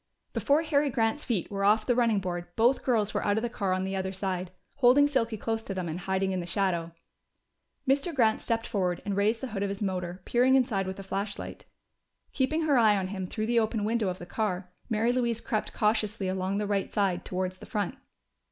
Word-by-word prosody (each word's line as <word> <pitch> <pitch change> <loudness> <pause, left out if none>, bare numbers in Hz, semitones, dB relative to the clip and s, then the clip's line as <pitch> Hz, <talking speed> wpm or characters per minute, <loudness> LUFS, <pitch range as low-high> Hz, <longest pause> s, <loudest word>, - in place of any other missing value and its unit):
Before 295 +3 +2
Harry 295 -2 +2
Grant's 230 +3 0
feet 215 -8 -1
were 195 -1 -2
off 215 +2 +4
the 245 - +3
running 235 -4 +3
board 175 -2 -4
both 240 +4 +3
girls 220 -5 +1
were - - -1
out 205 0 +2
of 220 - 0
the 240 - -2
car 200 -5 -1
on 185 0 +1
the 190 0 -2
other 190 0 -2
side, 185 -1 -3 0.3
holding 275 +2 +6
Silky 235 -6 0
close 225 +1 -2
to 195 - -4
them 185 -2 -2
and 165 +2 -4
hiding 190 +1 0
in 185 - -1
the 175 - -5
shadow. 175 -3 0 1.0
Mr. 275 +6 +2
Grant 230 -7 +2
stepped 230 -1 -1
forward 180 -5 -1
and 200 -1 -1
raised 210 +3 +2
the 265 - -4
hood 200 -3 -4
of 200 - 0
his 200 +1 -4
motor, 180 -1 -3
peering 250 +2 +4
inside 215 -7 +2
with 190 +1 -5
a - - -6
flashlight. 200 +1 -5 0.7
Keeping 305 +5 +1
her 290 -5 +4
eye 215 -3 +5
on 185 -1 -2
him 190 -2 -4
through 215 +4 -3
the 235 +1 +3
open 220 -1 0
window 220 0 +1
of 180 - -4
the 175 - -8
car, 185 -2 -2 0.2
Mary 225 +1 +2
Louise 235 -2 0
crept 215 -2 -2
cautiously 210 -2 +1
along 190 +1 -1
the 210 - -1
right 200 -1 -1
side 195 -4 0
towards 185 0 -3
the - - -11
front. 205 +2 -2
205 Hz, 225 wpm, -28 LUFS, 190-235 Hz, 1.0 s, holding